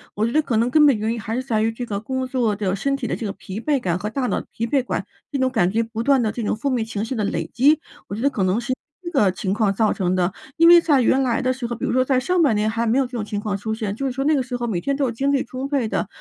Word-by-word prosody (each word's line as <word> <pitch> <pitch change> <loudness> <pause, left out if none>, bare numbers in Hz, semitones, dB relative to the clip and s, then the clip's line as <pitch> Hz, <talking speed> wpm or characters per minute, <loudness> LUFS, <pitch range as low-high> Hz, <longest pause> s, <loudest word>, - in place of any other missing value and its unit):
我 215 +2 +1
觉 230 - -1
得 310 - +3
可 245 -6 -2
能 230 +3 +2
根 300 0 +6
本 270 -6 +5
原 220 +2 -1
因， 230 - -3
还 225 +1 -3
是 255 - -2
在 220 -4 0
于 225 - +2
这 245 +1 -5
个 200 -3 -3
工 260 +4 -3
作 245 -5 0
的 195 -2 -1
身 275 +8 0
体 265 -3 -4
的 - - -2
这 225 - -5
个 195 - -3
疲 195 +3 -7
惫 280 0 0
感 175 -1 -1
和 210 - -3
大 255 +1 -2
脑 - - 0
的 - - -11
疲惫感， 245 +3 -1 0.2
这 280 - -2
种 260 0 +2
感 185 -8 +2
觉 225 +3 +1
不 225 0 -5
断 270 0 +3
地 215 -2 0
这 235 - -5
种 210 - 0
负 275 +6 -2
面 240 -4 0
情 215 -2 -4
绪 230 - -3
的 215 -4 -1
累 165 -4 -2
积， 290 +5 +4 0.3
我 200 - -5
觉 225 - -5
得 280 - +3
可 205 -8 -2
能 190 +6 +1
是 255 +2 -2 0.3
这 345 - -5
个 210 - +3
情 190 0 -2
况 210 -2 +1
造 215 +1 +2
成 185 -1 0
的。 180 0 +1 0.2
因 335 +1 +5
为 345 0 +10
在 290 -6 +3
原 260 +3 +3
来 250 0 +1
的 255 0 +1
时 255 -1 -4
候， 240 - -4
比 225 - -9
如 - - -1
说 255 +1 +3
在 265 -1 +2
上 350 +8 +1
半 265 -9 +3
年， 210 +1 +1
还 230 +1 -1
没 235 +4 +2
有 275 - +4
这 250 - -10
种 225 -4 -3
情 205 -1 -3
况 205 -2 -2
出 220 +2 -3
现， 215 -3 -3
就 275 - -4
是 265 - 0
说 270 +1 -2
那 310 - +4
个 270 - +1
时 250 0 -5
候， 240 -1 -2
每 185 -6 -1
天 275 +8 -1
都 270 -4 0
精 275 +5 0
力 275 - +2
充 255 +3 -5
沛 275 -6 0
的。 205 - -1
235 Hz, 375 characters per minute, -22 LUFS, 215-270 Hz, 0.3 s, 为